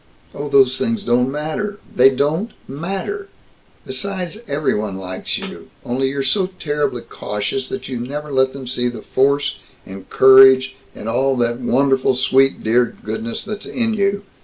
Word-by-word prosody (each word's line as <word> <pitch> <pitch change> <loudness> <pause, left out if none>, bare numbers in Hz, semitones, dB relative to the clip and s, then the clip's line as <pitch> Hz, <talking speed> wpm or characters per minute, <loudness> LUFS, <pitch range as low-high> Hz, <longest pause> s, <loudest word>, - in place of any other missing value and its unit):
"Oh, 145 +1 -5
those 135 -2 +4
things 225 -1 -1
don't 125 +2 +2
matter 160 +8 -3 0.2
they 130 +2 +7
don't 150 - -1
matter! 195 - -4 0.6
Besides, 195 0 -4
everybody 110 -9 -1
likes 95 -1 -4
you - - -8 0.2
only 135 +2 0
you're 140 0 -2
so 185 +8 +1
terribly 145 -6 -2
cautious 105 +6 -4
that 200 - -5
you 125 -3 -4
never 145 +5 -5
let 130 -1 +2
them 135 -1 -8
see 125 0 -1
the 115 -3 -8
force 140 +2 +1 0.3
and 95 0 -10
courage 130 0 +7 0.2
and 105 - -8
all 135 +4 +1
that 120 0 0
wonderful 130 +1 +2
sweet 135 +1 +2
dear 120 +2 +1
goodness 110 +2 -4
that's 210 -1 -6
in 230 -2 0
you. 200 -1 0
135 Hz, 155 wpm, -19 LUFS, 125-155 Hz, 0.6 s, they